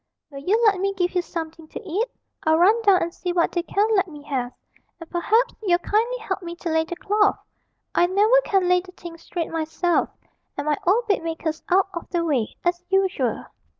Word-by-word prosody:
'Will 275 - -8
you 385 +10 +1
let 400 -3 +4
me 395 +1 -1
give 360 -1 0
you 360 - +2
something 325 -2 -7
to - - -7
eat? 400 +8 0 0.4
I'll 315 0 +3
run 410 +7 +4
down 400 -4 +4
and 335 0 -4
see 360 -1 -3
what 350 -1 +1
they 345 - 0
can 400 +4 +1
let 385 -1 +2
me 295 -3 -11
have; 260 -4 -3 0.5
and 330 - -10
perhaps 420 +8 +1
you'll 360 -5 +3
kindly 450 +7 0
help 395 -5 -4
me 340 -1 -6
to 345 0 -5
lay 320 0 +2
the 350 - -6
cloth; 410 +2 +2 0.6
I 350 - +4
never 425 +7 +4
can 385 -5 +1
lay 360 0 +4
the 365 0 -15
thing 345 -2 -10
straight 335 -1 -4
myself, 325 +2 0 0.5
and 285 - -3
my 300 -1 +1
old 450 +6 +3
bedmaker's 325 -4 -1
out 380 +1 +3
of 340 - -6
the 340 -1 -1
way, 260 -9 0
as 350 0 0
usual.' 385 0 0
355 Hz, 210 wpm, -23 LUFS, 330-395 Hz, 0.6 s, let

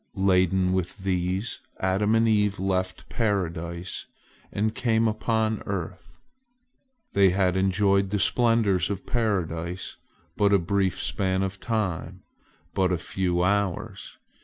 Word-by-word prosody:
Laden 95 -1 +2
with 95 0 -2
these, 95 +3 -1 0.2
Adam 100 +4 +1
and 115 0 +3
Eve 105 -2 +2
left 95 -1 -2
Paradise, 85 -5 -2 0.4
and 110 +2 0
came 115 -1 +1
upon 110 0 0
earth. 95 -2 -6 0.9
They 100 -1 +5
had 90 0 +1
enjoyed 95 +1 +2
the 105 - 0
splendors 105 -4 +3
of 100 -2 -4
Paradise 90 -6 -2 0.4
but 100 -1 +3
a - - +7
brief 95 +1 0
span 95 -1 0
of 95 0 -4
time—but 95 -2 -3
a 90 - +1
few 90 0 -1
hours. 100 -1 -1
95 Hz, 115 wpm, -26 LUFS, 90-105 Hz, 0.9 s, a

